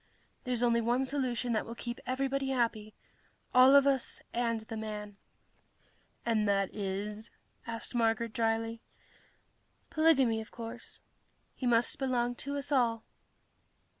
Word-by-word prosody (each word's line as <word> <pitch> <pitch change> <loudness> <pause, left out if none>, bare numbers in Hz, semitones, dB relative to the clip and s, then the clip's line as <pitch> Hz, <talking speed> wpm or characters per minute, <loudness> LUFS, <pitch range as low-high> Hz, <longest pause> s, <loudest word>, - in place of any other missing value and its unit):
There's 245 -1 0
only 235 -1 +3
one 240 +3 +1
solution 255 -3 -1
that 215 - +1
will 230 - -8
keep 240 0 -5
everybody 270 +1 -1
happy 230 -4 -1 0.6
all 255 +2 +8
of 280 -1 +7
us 270 -2 +1
and 230 -2 0
the 220 +1 -7
man." 210 -2 -6 1.1
"And 220 -3 +2
that 195 -1 +1
is...?" 205 +2 -4 0.4
asked 230 +1 -4
Marguerite 230 -1 +1
drily. 225 0 0 1.1
"Polygamy, 270 -8 +4
of 220 - -10
course. 230 +1 -7 0.5
He 255 - -3
must 235 0 +3
belong 245 -2 0
to 280 +1 -3
us 280 +1 -5
all." 235 -5 +2
235 Hz, 130 wpm, -31 LUFS, 225-255 Hz, 1.1 s, all